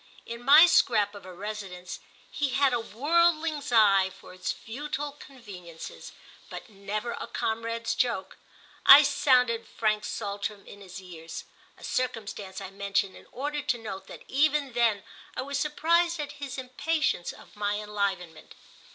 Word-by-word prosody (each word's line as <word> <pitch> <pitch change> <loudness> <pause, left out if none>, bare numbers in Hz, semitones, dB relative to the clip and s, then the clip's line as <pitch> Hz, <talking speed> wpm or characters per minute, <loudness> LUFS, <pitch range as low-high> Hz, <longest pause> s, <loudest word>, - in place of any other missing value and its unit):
In 235 +1 -7
my 295 +6 +9
scrap 230 - +3
of 200 -2 -11
a - - -8
residence—he 195 +7 -6
had 275 -2 +3
a 240 - +1
worldling's 310 +4 +1
eye 200 -4 +5
for 185 -1 -14
its 185 - -3
futile 290 +4 -5
conveniences, 200 - -11 0.4
but - - -8
never 210 +3 -4
a - - -6
comrade's 230 +1 -2
joke—I 245 +5 +4
sounded 250 -5 +2
Frank 215 -1 0
Saltram 205 -1 -4
in 205 - -13
his 190 0 -9
ears; 165 -3 -9 0.3
a - - -16
circumstance 210 -6 -3
I 195 -1 -8
mention 200 0 -1
in - - -15
order 290 +3 -3
to 265 -4 0
note 210 -4 -7
that - - -11
even 285 -1 +1
then 230 -5 +2 0.3
I - - -1
was 280 +1 -3
surprised 335 +3 +2
at 290 -1 -4
his 275 -2 -5
impatience 260 - -1
of - - -16
my 205 0 -1
enlivenment. 200 -6 -4
230 Hz, 145 wpm, -28 LUFS, 200-280 Hz, 0.4 s, my